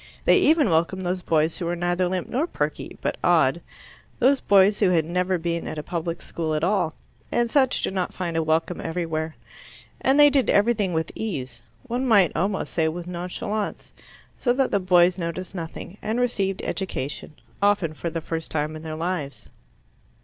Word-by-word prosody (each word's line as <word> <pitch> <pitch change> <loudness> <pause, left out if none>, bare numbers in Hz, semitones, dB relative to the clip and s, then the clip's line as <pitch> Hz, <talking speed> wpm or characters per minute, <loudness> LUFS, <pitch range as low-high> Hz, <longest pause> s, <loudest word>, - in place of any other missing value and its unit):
They - - +6
even 305 - +4
welcomed 170 +3 +1
those 180 +1 -1
boys 160 -1 +1
who 175 - -3
were 175 - -1
neither 175 +1 0
limp 185 -1 -2
nor 290 +7 -1
perky, - - -3
but - - -2
odd - - +3 0.6
those 265 +2 +4
boys 200 +1 +4
who 200 - +4
had 165 -4 +2
never 180 +2 0
been 170 0 -2
at - - -5
a 150 - -4
public 170 0 -4
school 160 -2 -2
at 155 - -1
all, 180 -4 +1 0.4
and 240 -1 +1
such 265 -3 +2
do - - 0
not 185 -2 -2
find 175 -3 -4
a 165 - +2
welcome 160 +2 0
everywhere. 160 -2 -3 0.6
And 270 +2 +3
they 290 0 +8
did 275 -2 +2
everything 205 -3 +2
with 160 0 -1
ease 130 - -4 0.2
one 250 +3 -2
might 200 -7 +5
almost 195 +2 -1
say 160 -2 +2
with 170 +2 -4
nonchalance, 180 +4 -4 0.4
so 245 - +1
that 265 +1 +1
the 200 - +2
boys 180 0 +4
noticed 170 +2 -4
nothing, 175 +2 -7
and 220 +3 -1
received 200 -6 0
education, 150 -5 -4 0.3
often 200 -6 +2
for 170 +2 -4
the 165 0 -4
first 160 0 -4
time 155 0 -2
in 155 - -8
their 160 -1 -5
lives. 165 -4 -4
180 Hz, 185 wpm, -24 LUFS, 165-205 Hz, 0.6 s, they